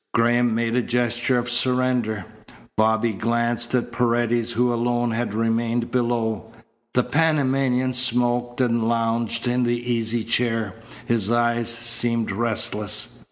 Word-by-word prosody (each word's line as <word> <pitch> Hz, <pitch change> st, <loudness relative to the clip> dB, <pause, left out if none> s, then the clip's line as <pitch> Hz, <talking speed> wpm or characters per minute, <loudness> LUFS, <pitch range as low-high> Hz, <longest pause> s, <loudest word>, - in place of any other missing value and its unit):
Graham 120 Hz, 0 st, +2 dB
made 115 Hz, 0 st, -1 dB
a 125 Hz, -, +2 dB
gesture 120 Hz, +1 st, 0 dB
of 120 Hz, 0 st, -1 dB
surrender. 125 Hz, -4 st, +1 dB, 0.5 s
Bobby 110 Hz, +1 st, +2 dB
glanced 120 Hz, +3 st, 0 dB
at 120 Hz, -1 st, -1 dB
Paredes 120 Hz, 0 st, 0 dB
who 120 Hz, +1 st, +1 dB
alone 120 Hz, 0 st, 0 dB
had 115 Hz, -2 st, -2 dB
remained 115 Hz, +1 st, -1 dB
below. 115 Hz, -3 st, -1 dB, 0.4 s
The 125 Hz, -, +3 dB
Panamanian 135 Hz, -5 st, +1 dB
smoked 120 Hz, 0 st, 0 dB
and 115 Hz, -2 st, +1 dB
lounged 115 Hz, 0 st, -1 dB
in 125 Hz, +1 st, +1 dB
the 120 Hz, 0 st, +1 dB, 0.2 s
easy 115 Hz, 0 st, -1 dB
chair. 115 Hz, -3 st, 0 dB, 0.3 s
His 110 Hz, -4 st, 0 dB
eyes 120 Hz, 0 st, +1 dB
seemed 115 Hz, -1 st, +1 dB
restless. 105 Hz, -1 st, 0 dB
120 Hz, 125 wpm, -22 LUFS, 115-120 Hz, 0.5 s, The